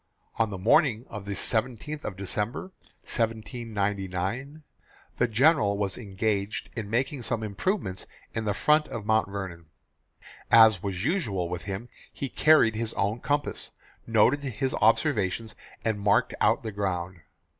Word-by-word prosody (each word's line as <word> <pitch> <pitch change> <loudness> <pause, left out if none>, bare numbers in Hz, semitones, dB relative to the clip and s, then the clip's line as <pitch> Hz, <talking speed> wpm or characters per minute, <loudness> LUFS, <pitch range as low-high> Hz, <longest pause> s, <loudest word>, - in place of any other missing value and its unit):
On 115 -2 +2
the 100 - -5
morning 120 - +3
of 105 -2 -7
the 100 - -3
17th 125 +8 -1
of 100 - -4
December, 105 - -2 0.3
1799, 110 - -2 0.5
the 125 - +3
General 115 -3 +3
was 100 -2 -1
engaged 105 0 -2
in 110 -4 -4
making 130 +4 -1
some 115 -1 -2
improvements 105 - -2 0.3
in 110 -1 -3
the 105 -2 0
front 150 +4 +3
of 105 - -6
Mount 110 -2 +2
Vernon. 95 -5 -6 0.8
As 110 -5 +7
was 95 0 -3
usual 110 - 0
with 90 -1 -5
him, 100 +4 -5 0.2
he 135 - -5
carried 155 -8 +5
his 110 0 -3
own 100 +4 0
compass, 145 +3 -2 0.3
noted 115 +5 +4
his 135 -1 -2
observations, 110 - +1 0.3
and 110 -2 0
marked 100 0 +3
out - - +3
the 110 - -4
ground. 95 -3 -3
110 Hz, 140 wpm, -27 LUFS, 100-125 Hz, 0.8 s, As